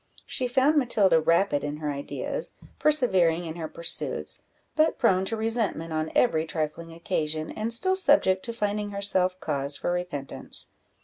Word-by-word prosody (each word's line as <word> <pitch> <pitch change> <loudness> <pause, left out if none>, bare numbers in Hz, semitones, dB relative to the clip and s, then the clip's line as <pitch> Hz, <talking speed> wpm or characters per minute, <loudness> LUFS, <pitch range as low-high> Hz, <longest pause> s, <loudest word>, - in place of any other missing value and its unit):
She 255 - 0
found 270 +5 +3
Matilda 200 - +3
rapid 165 -2 +2
in 145 0 -3
her 150 -1 -3
ideas, 145 - -4 0.3
persevering 190 - +3
in 160 - -5
her 160 -2 -4
pursuits, 170 +1 -2 0.3
but 310 +1 +3
prone 190 -6 +3
to 225 +3 -2
resentment 220 -8 -1
on 155 0 -2
every 160 -10 +3
trifling 160 +1 -3
occasion, 160 -3 -2
and 220 +2 -3
still 375 +11 +3
subject 285 - +3
to 235 - -3
finding 210 -2 -2
herself 190 -2 0
cause 140 0 -2
for - - -2
repentance. 175 -6 -4
185 Hz, 150 wpm, -26 LUFS, 160-230 Hz, 0.3 s, found